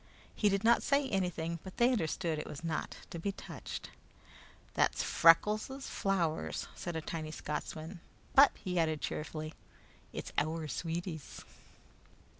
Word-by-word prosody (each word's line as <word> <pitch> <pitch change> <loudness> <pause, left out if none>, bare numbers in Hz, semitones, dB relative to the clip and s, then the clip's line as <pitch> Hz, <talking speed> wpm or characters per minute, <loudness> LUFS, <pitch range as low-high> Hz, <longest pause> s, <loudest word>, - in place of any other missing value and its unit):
He 210 - +3
did 195 +1 +1
not 235 +1 +6
say 280 -1 +2
anything, 170 -4 -1
but 190 - -9
they 240 +2 +5
understood 165 -6 0
it - - -5
was 150 - -7
not 165 -2 -2 0.2
to 170 - -4
be 200 +4 -1
touched. - - -7 0.8
"Thae's - - +2
Freckles' 215 +10 +4
flow'rs," 175 -5 0
said 175 -1 -5
a 160 - -1
tiny 155 0 -4
Scotsman, 155 +3 -5 0.3
"but," 275 +1 +9
he 180 -3 -1
added 155 -2 +2
cheerfully, 155 0 -4 0.6
"it's - - -6
oor 160 0 -3
sweeties!" 165 0 -4
170 Hz, 135 wpm, -33 LUFS, 160-195 Hz, 0.8 s, but